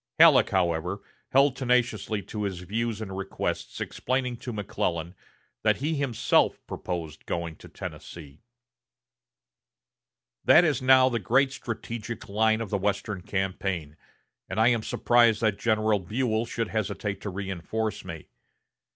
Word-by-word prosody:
Halleck, - - +7
however, 90 +1 0 0.3
held 135 0 +4
tenaciously 120 -5 0
to 105 - -6
his 95 -4 -3
views 110 +4 -2
and 95 -3 -5
requests, 95 0 -4
explaining 125 -1 -2
to 125 +1 -6
McClellan 90 -5 -2 0.5
that - - +3
he 150 +4 -1
himself 130 -6 +2
proposed 80 -4 -5
going 85 -1 -3
to - - -13
Tennessee: 75 -4 -9 2.0
"That 165 - +7
is 145 -6 +1
now 130 0 +6
the 120 -2 0
great 130 +7 +3
strategic 115 -2 -6
line 110 +2 +2
of 110 - -5
the 100 - +1
western 100 0 -1
campaign, 95 -5 -2 0.5
and - - -2
I 115 +2 +6
am 120 -2 +2
surprised 120 0 +3
that 110 -3 +1
General 110 -2 +2
Buell 110 +4 -1
should 115 -2 -2
hesitate 100 -2 -3
to 105 - -4
reinforce 95 +3 -3
me. - - -8
110 Hz, 135 wpm, -27 LUFS, 95-120 Hz, 2.0 s, Halleck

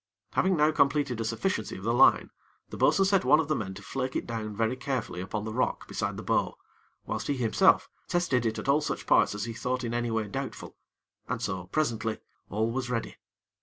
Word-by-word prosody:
Having 185 -1 +2
now 150 +1 +4
completed 140 -5 +1
a - - 0
sufficiency 115 - -2
of 95 - -10
the 115 +2 +1
line, 120 - +5 0.4
the - - -7
bo'sun 195 - +4
set 195 -1 +3
one 145 +4 +5
of 160 - 0
the 155 - +2
men 95 -6 -4
to 100 - -10
flake 130 -1 -3
it - - -1
down 110 -2 -4
very 115 +3 0
carefully 130 -9 -3
upon 105 +3 -4
the 110 - -4
rock 125 - -1
beside - - -3
the - - -6
bow, - - 0 0.5
whilst - - -3
he 140 - 0
himself 115 -3 +4 0.2
tested 155 -9 +1
it 110 - -2
at - - -5
all 140 +2 +4
such - - -3
parts - - +4
as 105 - -3
he 115 - -5
thought 125 +2 -2
in 120 -1 -3
any 120 0 -1
way 110 -2 -1
doubtful, 100 - -6 0.5
and - - -1
so, 90 -1 -3
presently, 115 -3 -1 0.3
all 110 +3 0
was 125 0 -3
ready. 115 -2 -3
120 Hz, 215 wpm, -28 LUFS, 110-140 Hz, 0.5 s, line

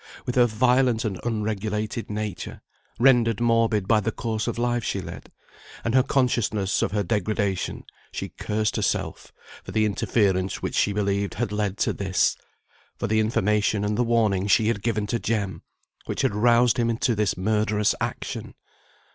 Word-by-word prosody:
With 125 - -2
her 125 -1 +5
violent 125 +1 +2
and 95 -4 -3
unregulated 110 -1 -2
nature, 105 -3 -5 0.3
rendered 120 -3 +4
morbid 115 -4 +2
by 115 - +4
the 105 +2 -1
course 110 0 -3
of 120 - -2
life 120 0 0
she 100 - -2
led, 95 - -9 0.5
and 115 - -1
her 130 - +6
consciousness 120 -7 +1
of - - 0
her 105 0 0
degradation, 100 -1 -1 0.3
she - - -5
cursed 105 0 -2
herself - - -2 0.3
for - - -8
the 110 -1 +2
interference 95 -2 0
which - - -4
she 105 - +2
believed 100 -1 -1
had 115 -2 -2
led 105 -1 -1
to - - +1
this; 95 -2 +1 0.6
for - - -3
the 110 +1 +1
information 105 -1 +1
and 105 0 0
the 125 - +2
warning 110 -5 +1
she 110 +2 +4
had 100 -3 -1
given 110 -2 -1
to 115 +3 -1
Jem, 100 -8 -2 0.5
which - - -2
had - - +2
roused 120 +2 +4
him 115 -1 +1
to 120 - +1
this 105 -4 0
murderous 105 +1 +1
action. - - -4
110 Hz, 165 wpm, -25 LUFS, 105-115 Hz, 0.6 s, her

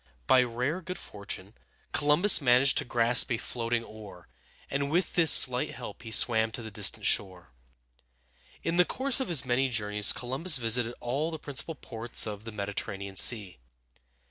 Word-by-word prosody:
By 130 - +4
rare 125 +8 -4
good 180 +1 -8
fortune, 100 -1 -8 0.4
Columbus 155 +6 +3
managed 125 +1 +2
to - - -6
grasp 120 +1 +3
a 120 - -1
floating 115 0 -4
oar, 105 - -14 0.4
and 140 0 -3
with 175 +5 -2
this 165 -3 +6
slight 125 -1 +5
help - - -10
he 115 - -10
swam 110 0 +2
to 120 - -6
the 110 - -9
distant 100 -1 -2
shore. 90 -9 -1 1.1
In 165 +1 -2
the 180 - +5
course 260 +8 +1
of 265 - -4
his 160 -7 +3
many 130 +2 -1
journeys 105 -3 +2
Columbus 130 +7 -1
visited 120 0 -1
all 140 +7 -3
the 160 - -7
principal 150 +2 -4
ports 115 -3 -3
of 105 0 -8
the 115 - -8
Mediterranean 100 -1 -6
Sea. 100 - +1
120 Hz, 165 wpm, -27 LUFS, 110-145 Hz, 1.1 s, this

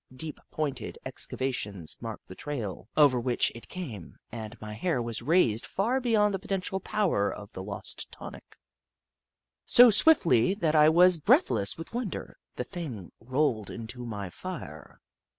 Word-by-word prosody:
Deep, 155 +3 -7
pointed 145 -4 -3
excavations 105 -10 -3
marked - - -7
the - - -9
trail 110 -5 -5
over 140 -5 +6
which 120 0 +1
it 115 - -12
came, 125 - -8
and 110 0 -7
my 105 0 -7
hair 150 +6 -1
was 120 0 -2
raised 145 -10 +3
far 235 +7 0
beyond 215 -5 +2
the 195 - -1
potential 190 -1 -2
power 195 - 0
of 100 0 -9
the 95 - -6
lost 100 +1 -5
tonic. - - -11 1.1
So 245 -1 +8
swiftly 190 - +5
that 165 -7 0
I 155 0 +6
was 175 +1 +6
breathless 110 -8 +3
with 165 +5 -9
wonder, 235 -5 -5 0.2
the - - -2
thing 125 - -7
rolled 130 -3 0
into 120 +2 -7
my 105 -5 -5
fire. 85 - -8
135 Hz, 150 wpm, -28 LUFS, 110-180 Hz, 1.1 s, So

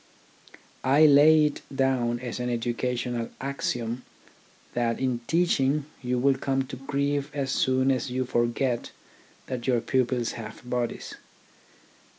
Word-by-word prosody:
I 140 +4 +5
lay 150 +1 +7
it 150 - -2
down 130 -3 +1
as 125 -1 -5
an 125 0 -2
educational 120 0 -2
axiom 125 -3 -3 0.7
that 120 -1 0
in 130 -2 0
teaching 150 -4 +2 0.2
you 125 -1 -1
will 135 +1 +2
come 135 -1 0
to - - -5
grief 140 +1 -1
as 135 -2 -1
soon 130 0 +2
as 130 0 -1
you 130 +1 -1
forget 120 +1 0 0.6
that 125 -1 -5
your 125 -2 +3
pupils 125 -1 0
have 115 +1 -9
bodies. 125 -1 -3
130 Hz, 130 wpm, -26 LUFS, 120-135 Hz, 0.7 s, lay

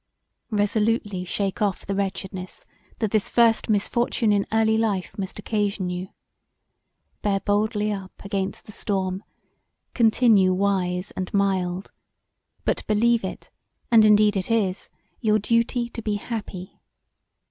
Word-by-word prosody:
Resolutely 210 -2 0
shake 195 +2 -2
of[f] 205 -2 0
the 200 - -2
wretchedness 190 -1 -4 0.3
that 220 -3 -1
this 215 -3 +1
first 230 -1 +3
misfortune 220 +2 +1
in 200 -1 +1
early 220 0 +3
life 215 -5 -1
must 190 -2 -5
occasion 205 -3 -1
you. 180 +1 -4 1.1
Bear 200 -1 +1
boldly 210 +1 0
up 195 -2 -5
against 195 -1 -3
the - - -11
storm: 190 -2 -2 0.7
continue 220 -5 +4
wise 185 -2 0
and 185 -1 -5
mild, 190 -2 0 0.7
but - - 0
believe 230 +2 +3
it, 190 - -7 0.4
and 225 -2 +7
indeed 210 0 +5
it 190 +1 -2
is, 205 -5 0 0.3
your 215 -2 +3
duty 230 +3 +1
to 230 - -7
be 215 -1 -1
happy. 205 -4 -6
205 Hz, 125 wpm, -24 LUFS, 190-220 Hz, 1.1 s, and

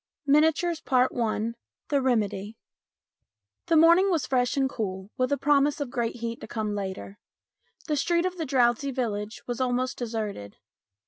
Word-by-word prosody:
MINIATURES 315 +3 +3
I 235 -3 +1 0.4
THE 285 -2 +2
REMEDY 215 -4 -1 1.1
THE 330 - +3
morning 340 +5 +6
was 335 -6 +1
fresh 250 +1 0
and 270 -1 +3
cool 195 -5 -5
with 255 +1 0
a 285 - +2
promise 290 +1 +2
of 280 -4 -4
great 235 -3 -2
heat 230 -1 -5
to - - -8
come 215 -2 -3
later. 195 0 -5 0.7
The 305 - 0
street 340 +4 +1
of 370 0 -2
the 320 - -1
drowsy 255 0 +2
village 215 -5 -3
was 245 0 -4
almost 255 0 -1
deserted. 215 - -4
250 Hz, 150 wpm, -26 LUFS, 220-290 Hz, 1.1 s, morning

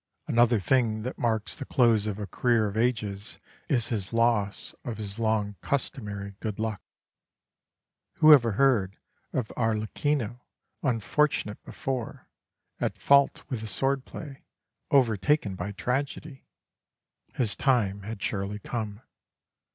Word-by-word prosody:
Another 120 -1 +4
thing 110 +1 +1
that 125 - -5
marks 110 -2 0
the - - -6
close 115 -5 +3
of 105 -2 -3
a 105 - -4
career 115 0 +1
of 100 - -5
ages 110 -3 -1 0.3
is 120 -5 +2
his 100 -5 -2
loss 115 -3 +1
of 120 -3 -5
his 105 0 -6
long 110 -3 0
customary 105 -8 -3
good 105 -2 -4
luck. 110 -2 -3 1.3
Who 155 0 +8
ever 120 -6 +5
heard 110 -6 +2 0.3
of 120 -4 -2
Arlecchino 115 +2 -1 0.4
unfortunate 125 -2 0
before, 130 -4 -5 0.5
at - - -1
fault 140 0 +4
with 125 -6 -4
his 110 - -5
sword 135 +7 0
play, 140 -3 -9 0.5
overtaken 120 -2 +3
by 95 +2 -4
tragedy? 135 +6 -3 0.9
His 115 -5 +2
time 105 -7 +1
had 105 +1 -6
surely 100 0 -2
come. 105 0 -5
115 Hz, 125 wpm, -27 LUFS, 105-130 Hz, 1.3 s, Who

